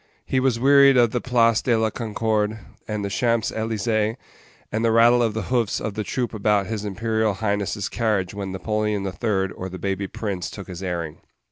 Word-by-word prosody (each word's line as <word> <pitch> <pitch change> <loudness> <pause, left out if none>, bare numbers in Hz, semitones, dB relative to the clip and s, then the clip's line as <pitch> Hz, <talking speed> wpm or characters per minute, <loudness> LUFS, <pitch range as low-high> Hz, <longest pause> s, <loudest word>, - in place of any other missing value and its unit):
He 130 - +1
was 130 -3 +1
weary 140 +1 +6
of 120 -2 +4
the 120 - -1
Place 115 -3 +3
de 120 -3 +2
la 110 -1 +1
Concorde, 110 -1 -1 0.3
and 105 -2 -3
the - - -2
Champs 115 -1 +1
Elysées, 110 0 -1 0.5
and 110 +2 -1
the 115 - +3
rattle 120 +2 +5
of 115 -3 0
the 110 - -2
hoofs 120 -4 +1
of 110 - -4
the 105 - -3
troop 120 +3 -2
about 105 -2 +1
his 110 0 -4
imperial 110 +1 -1
highness's 100 -1 -1
carriage 105 -5 -1
when 100 -2 -5
Napoleon 105 +1 -1
the 95 - -2
Third 95 0 -1
or 95 - -6
the 95 - -7
baby 95 +1 -2
prince 95 -6 -4
took - - -9
his 90 -1 -8
airing. 85 -4 -4
110 Hz, 200 wpm, -23 LUFS, 100-115 Hz, 0.5 s, weary